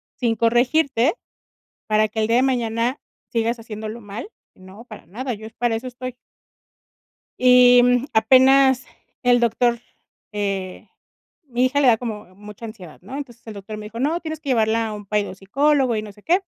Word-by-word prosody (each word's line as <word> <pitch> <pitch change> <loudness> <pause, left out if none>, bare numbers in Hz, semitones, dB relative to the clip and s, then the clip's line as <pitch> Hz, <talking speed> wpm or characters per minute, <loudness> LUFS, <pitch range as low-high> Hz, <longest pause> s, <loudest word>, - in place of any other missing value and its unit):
sin 235 -2 0
corregirte, 245 - +2 0.7
para 215 0 +3
que 220 +1 -4
el 215 - 0
día 230 - +3
de 255 - +4
mañana 240 -1 0 0.3
sigas 230 +1 0
haciéndolo 220 0 -7
mal, 205 - -8 0.3
¿no? 190 +5 -14
Para 215 -4 -13
nada, 245 +6 -5
yo 215 +1 -10
es 220 - -12
para 240 -1 0
eso 230 +3 -4
estoy". 250 0 -7 1.2
Y, 250 -1 +7
mm, 245 +1 +2
apenas 260 +3 +5 0.4
el 245 -1 +4
doctor. 235 0 +1 0.5
eh, 195 -3 -4 0.6
mi 250 -2 0
hija 285 +3 0
le 275 - +3
da 235 - +6
como 210 -6 -7
mucha 210 +2 -12
ansiedad, 185 -8 -12
¿no? 210 +9 -8
Entonces, 245 -5 -9
el 220 - -8
doctor 205 +2 -8
me 210 - -8
dijo: 230 +2 -9
"No, 310 +6 0
tienes 315 -1 -5
que 285 - -5
llevarla 225 -1 +1
a - - -5
un 205 -1 -9
pai 210 +1 +1
de - - -7
un - - -8
psicólogo 265 +4 +1
y 215 - -2
no 210 -1 -9
sé 210 0 -21
qué". 360 +4 +2
235 Hz, 190 wpm, -21 LUFS, 215-255 Hz, 1.2 s, Y